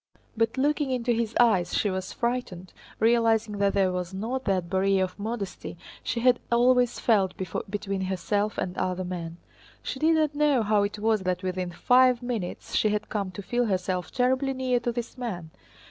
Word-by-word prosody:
But 225 +2 0
looking 290 +1 +1
into 250 -2 0
his 230 -1 -1
eyes 195 -8 +3
she 205 - +1
was 185 0 -4
frightened, 235 -7 -3 0.3
realizing 225 -2 +2
that 200 0 +2
there 190 -2 +3
was 180 0 -4
not 245 +7 -3
that 185 -4 0
barrier 190 +1 +2
of 185 +1 -5
modesty 205 -5 -5 0.3
she 235 - -2
had 250 0 +4
always 245 0 +3
felt 195 -5 +2
between 195 +2 -4
herself 205 +3 -1
and 180 - -3
other 185 0 -1
men. 170 -2 -5 0.5
She 265 - -4
did 320 +2 +4
not 310 -2 +1
know 290 -5 +2
how 210 0 +2
it 205 +1 -2
was 215 0 +1
that 185 0 -2
within 185 -1 -2
five 250 +5 +4
minutes 230 -8 -4
she 215 - +3
had 210 0 -2
come 200 -3 -2
to 200 +2 -8
feel 245 +5 0
herself 185 -2 -1
terribly 260 +2 +1
near 255 -1 0
to 240 0 -2
this 240 +2 -6
man. 180 -10 -5
215 Hz, 180 wpm, -26 LUFS, 185-245 Hz, 0.5 s, had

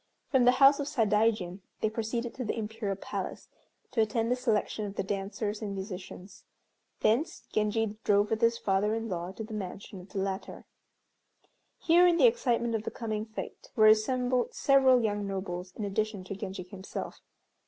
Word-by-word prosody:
From 260 -4 +4
the 250 - +7
house 275 +2 +6
of 285 - -2
Sadaijin 210 -6 +1 0.2
they - - +3
proceeded 230 +1 -3
to 260 - -5
the 225 - -2
Imperial 215 -2 -3
Palace 195 - -6 0.4
to 230 - +2
attend 225 +2 0
the - - +4
selection 220 -4 -1
of 200 - -8
the - - -1
dancers 205 +2 -3
and 200 -2 -4
musicians. 190 0 -8 0.6
Thence 245 +9 +1
Genji 215 0 0
drove 205 0 +3
with 220 +1 0
his 230 0 +3
father 205 +2 +1
in 225 0 -3
law 175 -1 -3
to 220 - -6
the 220 0 -8
mansion 195 -1 -6
of 180 - -15
the - - -7
latter. 195 0 -4 1.1
Here 350 +2 +5
in 345 -1 +4
the - - +6
excitement 240 - +2
of 220 - 0
the - - -4
coming 220 -2 -4
fête 220 - -8
were 215 - +5
assembled 245 +3 +3
several 265 -3 +5
young 205 -2 -1
nobles, 185 -2 -4
in 215 - -3
addition 205 0 -2
to 190 +1 -6
Genji 190 -1 -5
himself. 190 +1 -7
215 Hz, 175 wpm, -29 LUFS, 195-235 Hz, 1.1 s, the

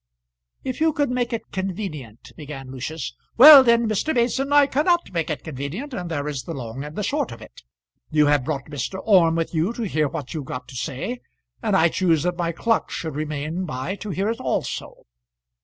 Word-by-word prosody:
"If 260 +2 -4
you 320 -1 +3
could 290 -4 0
make 245 -1 -1
it 230 - -5
convenient 180 - -5
" - - -35
began 140 -4 -8
Lucius. 135 - -5 0.2
"Well, 285 +1 +11
then, 235 -1 +3
Mr. 220 +9 0
Mason, 255 +4 +1
I 290 0 +6
cannot 310 - +1
make 165 -2 -1
it 155 - -3
convenient, 160 - -6
and 180 -6 -4
there 145 -3 -3
is 145 -3 -3
the 165 - -7
long 125 +1 -6
and 150 +1 -8
the 210 - -2
short 280 +5 -1
of 115 - -9
it. 110 - -14 0.5
You 150 -1 +3
have 145 -2 +3
brought 140 -2 -3
Mr. 150 +5 -4
Orme 175 -6 +5
with 165 0 -2
you 165 +6 +1
to 235 - -4
hear 155 -7 0
what 145 -2 -6
you've 155 -4 -4
got 125 -1 -6
to 130 - -11
say, 155 - -4 0.4
and 215 -4 +1
I 170 - +5
choose 165 -4 +1
that 180 0 0
my 170 -1 -1
clerk 225 +7 0
shall 160 - -4
remain 155 +4 -3
by 130 +3 -4
to 210 - -7
hear 195 +3 -1
it 230 - -5
also. - - -3
170 Hz, 210 wpm, -23 LUFS, 145-230 Hz, 0.5 s, Well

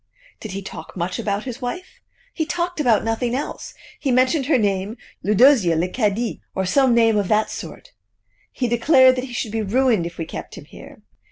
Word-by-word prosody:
"Did 215 -4 -7
he 195 0 -5
talk 195 - -9
much 180 +5 -3
about 210 -2 -2
his 250 0 -7
wife?" 290 +10 -6 0.3
"He 320 - -1
talked 345 +2 -3
about 240 -7 +3
nothing 235 +2 -1
else. 280 - -5 0.2
He 280 - -2
mentioned 255 +3 +2
her 300 - +4
name 200 0 -1 0.2
Eudosia 210 - +4
Leocadie, 205 +6 -1
or 190 - -1
some 255 +5 +3
name 225 -2 +4
of 200 -2 0
that 215 +1 +1
sort. - - -9 0.6
He 250 - -2
declared 255 +2 +5
that 250 - -2
he 250 - -10
should 220 -2 -3
be 225 0 -1
ruined 220 -3 +1
if 170 - -11
we 165 - -4
kept - - -8
him - - -10
here. - - -14
230 Hz, 190 wpm, -21 LUFS, 200-260 Hz, 0.6 s, declared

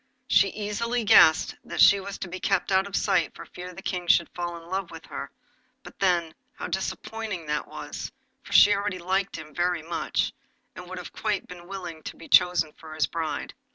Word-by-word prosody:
She 195 - +5
easily 225 +4 -2
guessed 160 -6 +6
that - - -6
she 200 0 +8
was 200 +1 -6
to 195 - -5
be 185 +1 -6
kept 195 0 0
out 190 +1 +3
of 200 - -5
sight 170 -4 +1
for - - -9
fear 180 0 -9
the 190 +2 -11
King 180 -1 -3
should 170 0 +4
fall 175 -1 -4
in 165 0 -13
love 190 0 -3
with 165 -1 -10
her; 140 - -6 0.5
but - - -13
then, 175 -4 +2 0.2
how - - -6
disappointing 205 -1 -4
that 150 0 -2
was, - - -7 0.3
for - - -14
she 205 - +8
already 200 -2 -1
liked 190 +2 -1
him 155 -1 -9
very 175 0 0
much, 170 +1 -1 0.4
and 180 -1 -9
would 185 - -6
have 180 - -8
been - - -11
quite 180 -5 -3
willing 180 -4 -7
to - - -8
be 165 - -12
chosen 165 -4 +4
for 155 -1 -11
his 155 - +2
bride! 160 -3 -4
180 Hz, 205 wpm, -26 LUFS, 165-195 Hz, 0.5 s, she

